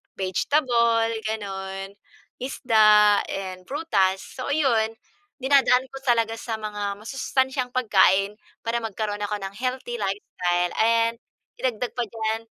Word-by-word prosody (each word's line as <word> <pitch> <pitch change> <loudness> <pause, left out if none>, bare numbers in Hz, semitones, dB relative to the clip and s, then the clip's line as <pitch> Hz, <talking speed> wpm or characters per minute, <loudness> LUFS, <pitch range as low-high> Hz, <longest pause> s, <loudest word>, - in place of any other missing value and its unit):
vegetable 230 - +2 0.2
gano'n, 195 -2 -5 0.5
isda 215 -5 +5
and 185 -1 -5
prutas. 195 -11 +1 0.2
So 255 - -4
ayun, 230 -7 +2 0.5
dinadaan 265 -1 +4
ko 270 - -7
talaga 230 -3 +2
sa 225 - -5
mga 205 -1 -4
masustansyang 260 +1 -1
pagkain 200 -4 +3 0.3
para 230 +1 0
magkaroon 210 -1 -3
ako 210 0 -2
ng 195 0 -5
healthy 255 0 -3
lifestyle 180 -3 -1
and 230 +1 +3 0.4
idagdag 245 -1 -2
pa 245 - +1
diyan, 220 0 -2
220 Hz, 115 wpm, -24 LUFS, 200-250 Hz, 0.5 s, isda